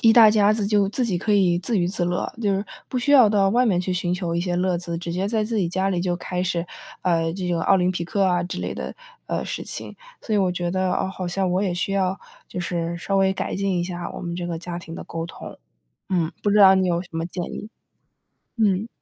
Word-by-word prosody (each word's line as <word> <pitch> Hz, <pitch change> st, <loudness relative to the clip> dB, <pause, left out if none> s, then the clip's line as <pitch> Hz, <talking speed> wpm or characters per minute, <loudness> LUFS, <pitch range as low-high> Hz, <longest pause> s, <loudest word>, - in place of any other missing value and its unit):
一 225 Hz, -, +7 dB
大 225 Hz, -2 st, +8 dB
家 210 Hz, -1 st, +4 dB
子 215 Hz, -2 st, -1 dB
就 205 Hz, -2 st, +3 dB
自 245 Hz, +5 st, -1 dB
己 195 Hz, -7 st, 0 dB
可 210 Hz, +4 st, 0 dB
以 180 Hz, -4 st, +3 dB
自 210 Hz, +4 st, -1 dB
娱 175 Hz, -, +2 dB
自 185 Hz, -1 st, -1 dB
乐， 175 Hz, 0 st, -2 dB
就 210 Hz, -3 st, +1 dB
是 195 Hz, +2 st, -1 dB, 0.2 s
不 -, -, -4 dB
需 255 Hz, +4 st, 0 dB
要 255 Hz, -6 st, +8 dB
到 200 Hz, -2 st, +3 dB
外 245 Hz, +4 st, +3 dB
面 190 Hz, -6 st, +2 dB
去 185 Hz, +1 st, -2 dB
寻 175 Hz, 0 st, 0 dB
求 175 Hz, -2 st, -2 dB
一 -, -, +1 dB
些 175 Hz, 0 st, -1 dB
乐 180 Hz, -1 st, +1 dB
子， 170 Hz, -1 st, -4 dB
直 170 Hz, 0 st, -4 dB
接 185 Hz, +3 st, -1 dB
在 220 Hz, -1 st, +1 dB
自 220 Hz, 0 st, -1 dB
己 180 Hz, -4 st, +1 dB
家 190 Hz, +3 st, 0 dB
里 180 Hz, -2 st, 0 dB
就 175 Hz, -1 st, 0 dB
开 180 Hz, 0 st, -3 dB
始， 170 Hz, -2 st, -1 dB, 0.4 s
呃， 165 Hz, -2 st, +1 dB
这 185 Hz, -1 st, -4 dB
个 170 Hz, -1 st, 0 dB
奥 195 Hz, -, +5 dB
林 180 Hz, -1 st, +2 dB
匹 175 Hz, -2 st, -3 dB
克 195 Hz, +4 st, 0 dB
啊 180 Hz, -2 st, +2 dB
之 180 Hz, -, -5 dB
类 -, -, -3 dB
的 -, -, -6 dB, 0.3 s
呃， -, -, -2 dB
事 -, -, -4 dB
情， -, -, -4 dB, 0.3 s
所 220 Hz, -, -2 dB
以 -, -, +3 dB
我 190 Hz, -2 st, +2 dB
觉 175 Hz, -1 st, -2 dB
得， 185 Hz, 0 st, 0 dB
哦， -, -, 0 dB
好 185 Hz, -2 st, -4 dB
像 185 Hz, +1 st, 0 dB
我 185 Hz, +2 st, +1 dB
也 185 Hz, -3 st, 0 dB
需 180 Hz, +3 st, -1 dB
要 190 Hz, -1 st, 0 dB, 0.3 s
就 -, -, -6 dB
是 170 Hz, -1 st, -2 dB
稍 195 Hz, +3 st, -1 dB
微 190 Hz, 0 st, +3 dB
改 -, -, -3 dB
进 195 Hz, -2 st, 0 dB
一 -, -, -1 dB
下 175 Hz, -1 st, -5 dB
我 -, -, -7 dB
们 170 Hz, -1 st, -4 dB
这 175 Hz, -1 st, -3 dB
个 170 Hz, -1 st, -3 dB
家 175 Hz, +1 st, -5 dB
庭 165 Hz, -1 st, -9 dB
的 -, -, -7 dB
沟 165 Hz, 0 st, -5 dB
通。 165 Hz, -, -10 dB, 0.5 s
嗯， 170 Hz, -4 st, 0 dB
不 205 Hz, -, +2 dB
知 205 Hz, -, +3 dB
道 190 Hz, -2 st, +9 dB
你 190 Hz, -1 st, +2 dB
有 170 Hz, 0 st, +1 dB
什 180 Hz, -, -16 dB
么 165 Hz, 0 st, -2 dB
建 175 Hz, 0 st, -5 dB
议？ 210 Hz, -, -6 dB, 0.9 s
嗯。 210 Hz, -2 st, +2 dB
185 Hz, 290 characters per minute, -23 LUFS, 175-200 Hz, 0.9 s, 道